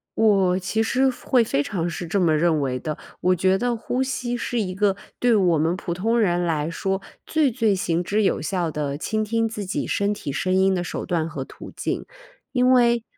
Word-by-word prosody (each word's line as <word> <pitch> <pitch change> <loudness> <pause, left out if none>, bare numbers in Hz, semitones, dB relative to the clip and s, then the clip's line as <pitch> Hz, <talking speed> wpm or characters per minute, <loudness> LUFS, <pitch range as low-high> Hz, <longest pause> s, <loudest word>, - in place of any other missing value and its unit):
我 195 -4 +3
其 190 +4 -1
实 260 +4 +2
会 250 -1 +1
非 145 -10 0
常 175 +1 -2
是 170 +1 -5
这 195 +5 0
么 165 -4 +3
认 160 -1 +2
为 130 -2 -1
的， 155 +1 -4 0.2
我 185 0 +3
觉 185 +2 +2
得 245 0 0
呼 245 +3 -2
吸 250 -2 -2
是 240 0 -2
一 185 -4 -2
个 200 0 +2 0.2
对 245 -2 +4
我 180 -5 +3
们 165 +3 +1
普 175 -2 -4
通 225 +6 +1
人 175 -5 +2
来 155 -3 0
说 190 +3 -2 0.3
最 310 -4 +2
最 225 -4 +2
行 175 -2 0
之 205 +4 +1
有 - - +1
效 175 0 -1
的， 145 -2 -3
倾 215 +7 -1
听 225 +1 0
自 215 -2 -5
己 - - -2
身 200 +1 0
体 145 - -5
声 185 +6 -1
音 190 0 +4
的 180 - -1
手 - - -4
段 165 -2 -1
和 140 -4 -5
途 - - -11
径。 - - -3 0.5
因 250 -1 +3
为 240 -2 +4
190 Hz, 230 characters per minute, -23 LUFS, 170-225 Hz, 0.5 s, 对